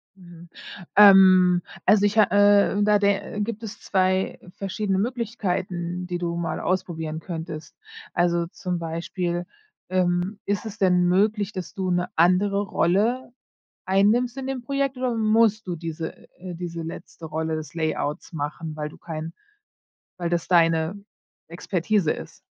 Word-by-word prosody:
Mhm, 175 -2 -14 0.5
ähm, 185 -3 +7 0.2
also, 205 -1 +5
ich 205 +2 0
ha 215 - +8
äh, 205 0 +4
da 210 0 +4
der 200 +1 0
gibt 225 +1 -4
es 220 0 -7
2 185 -1 0 0.2
verschiedene 195 0 -2
Möglichkeiten, 185 -6 -2
die 175 -1 -2
du 170 -1 -3
mal 170 -1 -3
ausprobieren 160 -4 -2
könntest. 160 -2 -7 0.4
Also, 170 -1 +1
zum 180 -1 -4
Beispiel, 170 +1 -3 0.4
ähm, 185 +2 0
ist 205 +2 -1
es 220 0 -7
denn 180 -3 +3
möglich, 205 +2 +2
dass 185 -3 -6
du 190 -3 -2
'ne 175 0 0
andere 185 +4 +3
Rolle 215 +8 +1 0.5
einnimmst 220 +7 +2
in 265 0 -4
dem 270 -2 -3
Projekt, 275 +1 -1
oder 250 -2 -1
musst 220 -1 +2
du 175 - -2
diese 165 0 -5 0.2
äh, 180 -1 -7
diese 170 -1 -5
letzte 165 0 -9
Rolle 160 +1 -2
des 155 0 -7
Layouts 155 -2 -2
machen, 155 +1 -4
weil 150 -1 -4
du - - -15
kein 160 0 -6 0.9
weil 175 -1 -2
das 170 -1 -1
deine 165 0 +3 0.5
Expertise 180 +1 0
ist? - - -10
180 Hz, 145 wpm, -24 LUFS, 170-205 Hz, 0.9 s, ha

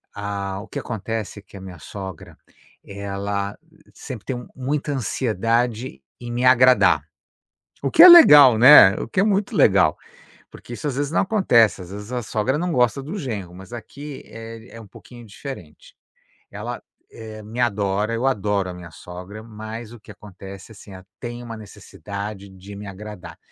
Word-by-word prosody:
hã, 100 -1 -4
o 110 - -10
que - - -6
acontece 110 -1 -5
é - - -13
que 100 - -18
a 95 - -9
minha 90 -2 -10
sogra, 95 +1 -9 0.5
ela 100 0 -4 0.4
sempre 125 -7 -9
tem 125 -2 -5
muita 145 +3 -3
ansiedade 115 - -2 0.2
em 120 -1 -8
me 120 +1 -2
agradar, 130 0 +5 0.8
o - - -1
que 325 - +6
é 365 - +12
legal, 150 - +9
né, 120 -5 +8
o - - -5
que 185 - 0
é - - +4
muito 205 +2 0
legal, 95 - +3 0.5
porque 120 - -11
isso, 115 - -7
às 135 -3 -2
vezes, 145 0 -2
não - - +1
acontece, 125 - +3
às 90 0 -10
vezes, 105 +4 -9
a 125 -1 -2
sogra 115 +7 -1
não 175 0 -2
gosta 125 +1 +1
do 175 +9 -6
genro, 100 - -6
mas 95 +5 -13
aqui 140 +5 -9
é 115 +1 -11
é - - -10
um 110 - -12
pouquinho 120 +4 -14
diferente. 105 - -11 0.5
Ela, - - -7 0.3
eh, 110 -1 -10
me 110 +4 -10
adora, 105 -2 0
eu 120 +4 -1
adoro 105 -5 0
a 90 - -7
minha 85 -1 -11
sogra, 90 +6 -10
mas 110 +1 -9
o 115 - -14
que 110 - -16
acontece, 100 0 -12
assim, 100 -1 -14
ela 95 0 -12
tem 120 0 -7
uma 115 -1 -8
necessidade 100 -1 -9
de 95 +2 -12
me 105 0 -9
agradar 95 -4 -10
110 Hz, 175 wpm, -22 LUFS, 100-125 Hz, 0.8 s, é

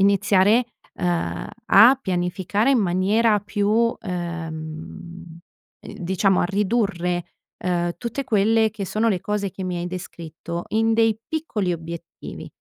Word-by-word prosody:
iniziare, 200 +3 +4 0.3
uhm, 165 - -2 0.2
a 255 +4 +7
pianificare 190 +5 0
in 260 - +4
maniera 205 +4 +2
più 205 0 -1
uhm, 230 +2 +2
uhm, 170 -1 -6 0.6
diciamo 190 +2 +1
a - - +2
ridurre, 195 -3 0 0.4
uhm, 175 -1 0
tutte 245 +3 -4
quelle 220 -1 +3
che 200 -2 -5
sono 220 +4 +1
le 185 -5 0
cose 210 -1 -2
che 190 +1 -7
mi 180 -1 -2
hai 175 - -3
descritto 170 -1 -7
in 225 +1 +2
dei 225 -1 +3
piccoli 230 - -2
obiettivi. 170 0 -8
190 Hz, 130 wpm, -23 LUFS, 175-220 Hz, 0.6 s, a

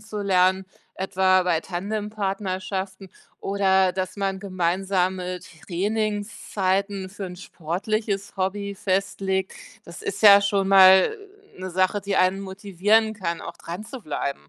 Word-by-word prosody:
zu 215 -1 -6
lernen, 190 -1 +2 0.3
etwa 185 -1 +2
bei 175 -3 +1
Tandempartnerschaften 195 -1 -4 0.3
oder 190 -2 +2
dass 185 +1 -4
man 195 -1 -2
gemeinsame 185 -1 -1
Trainingszeiten 200 +1 -2
für 195 0 -6
'n 180 0 -9
sportliches 195 +4 -3
Hobby 200 +1 -2
festlegt. 190 0 -1 0.3
Das 170 0 -11
ist 200 +2 -4
ja 200 -1 +9
schon 200 -1 0
mal 190 - +7 0.4
'ne 185 0 -5
Sache, 185 +3 +1
die 200 0 -2
einen 185 +1 +2
motivieren 200 +3 +1
kann, 170 -5 -4
auch - - -8
dranzubleiben. 170 - -6
190 Hz, 115 wpm, -24 LUFS, 185-200 Hz, 0.4 s, ja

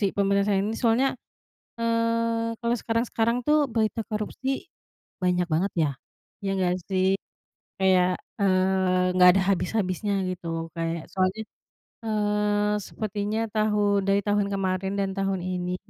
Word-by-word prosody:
korupsi 195 - +2
penyelesaiannya 200 +1 +1
soalnya, 245 +3 +3 0.7
eee, 230 0 0
kalau 235 0 +1
sekarang-sekarang 230 +1 0
tuh, 300 -1 +4
berita 225 0 0
korupsi, 260 - -3 0.5
banyak 180 -1 +2
banget 170 +5 0
ya. 155 -3 +2 0.5
Iya 195 - 0
nggak 180 -1 +2
sih? 185 -1 +1 0.7
Kayak, 185 -1 +4 0.3
eee, 185 -1 +2
nggak 180 0 +8
ada 195 - +3
habis-habisnya 200 +1 -1 0.2
gitu. 165 -2 -4
Kayak 165 0 -3
soalnya, 190 +3 0 0.6
eee, 210 -1 +1
sepertinya 210 +2 -3
tahu 210 -2 +2
dari 195 +1 +3
tahun 205 -1 +1
kemarin 190 0 -1
dan 195 -1 0
tahun 195 -1 -1
ini, 180 0 -2
200 Hz, 120 wpm, -26 LUFS, 185-220 Hz, 0.7 s, nggak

